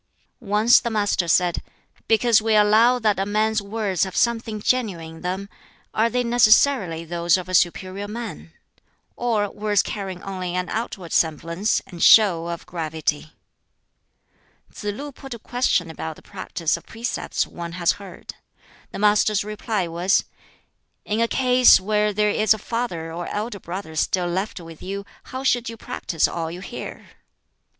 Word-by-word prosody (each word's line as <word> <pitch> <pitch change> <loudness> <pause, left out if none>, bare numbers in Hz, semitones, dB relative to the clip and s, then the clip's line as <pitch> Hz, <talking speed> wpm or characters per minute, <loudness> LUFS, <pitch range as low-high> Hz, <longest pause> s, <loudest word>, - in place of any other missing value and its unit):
Once 220 +3 +6
the 235 - -3
Master 205 -5 0
said, 175 +1 +2 0.5
"Because 225 0 +4
we 220 0 +2
allow 215 +4 +5
that 215 -4 +1
a 195 - 0
man's 215 +1 +1
words 200 -3 -1
have 190 -2 -4
something 225 -2 0
genuine 190 -9 -1
in - - -14
them, 185 +2 -3 0.5
are 225 +2 +2
they 250 +1 0
necessarily 225 -7 +3
those 170 +2 +2
of 185 0 -6
a 185 - -6
superior 185 +3 +1
man? 220 -6 -7 0.6
or 225 -4 0
words 205 -1 +1
carrying 190 -4 -5
only 185 -2 -4
an 180 0 -2
outward 200 -6 -4
semblance 170 +6 +1
and 175 -3 -10
show 180 -7 +6
of 170 -1 -5
gravity?" 160 -2 -3 1.4
Tsz - - -10
lu 270 +8 -4
put 270 -2 -9
a - - -8
question 225 -8 0
about 160 0 -6
the - - -17
practice 185 -4 -2
of 170 - -11
precepts 230 +2 -2
one 170 -1 -8
has 170 -1 +2
heard. 195 -2 -10 0.6
The - - -6
Master's 210 0 +3
reply 210 -2 -2
was, 175 +3 +1 0.8
"In 210 +2 -1
a 230 - +3
case 250 0 +5
where 210 +2 +1
there 210 +1 +1
is 215 +1 +3
a - - -7
father 195 -8 -4
or 175 +1 -5
elder 210 0 -4
brother 170 -2 -7
still 180 +3 +1
left 190 +4 -3
with 165 -2 -12
you, 200 +1 -5 0.2
how 260 +1 -6
should 245 -3 +1
you 230 - -8
practise 165 -6 -1
all 165 -1 -4
you 175 +2 -8
hear?" 220 - -8
200 Hz, 160 wpm, -23 LUFS, 175-220 Hz, 1.4 s, Once